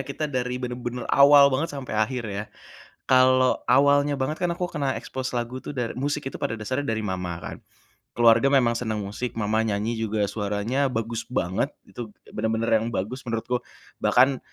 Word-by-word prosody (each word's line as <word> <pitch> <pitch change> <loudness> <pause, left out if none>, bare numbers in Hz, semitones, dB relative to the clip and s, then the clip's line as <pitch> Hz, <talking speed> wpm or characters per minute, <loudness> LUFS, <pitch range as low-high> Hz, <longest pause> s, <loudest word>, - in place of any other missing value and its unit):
Kita 140 +3 -4
dari 125 -2 -2
benar-benar 125 -1 -4
awal 140 0 +7
banget 145 +5 -1
sampai 130 -4 -6
akhir 120 +3 0
ya. 100 +1 -4 0.6
Kalau 130 0 +4
awalnya 145 0 +4
banget 150 +4 -1
kan 175 - +1
aku 180 +1 -2
kena 140 -5 -2
ekspos 130 0 -5
lagu 125 +1 -4
itu, - - -5
dar 120 -4 -3
musik 145 +2 -2
itu 135 - -7
pada 115 0 -2
dasarnya 130 +6 -2
dari 110 - -1
mama 90 -3 -3
kan. - - -7 0.6
Keluarga 115 +2 +5
memang 125 -4 +3
senang 110 -3 -2
musik, 105 +5 -5
mama 110 0 0
nyanyi 110 +2 -1
juga 110 -1 -1
suaranya 105 +6 -1
bagus 115 0 -3
banget. 95 -7 -1 0.2
Itu 105 +1 -9 0.2
benar-benar 110 +1 +1
yang 115 +1 -3
bagus 125 +7 -4
menurutku, 115 +2 -1 0.4
bahkan 130 +2 +4
125 Hz, 170 wpm, -25 LUFS, 110-135 Hz, 0.6 s, awal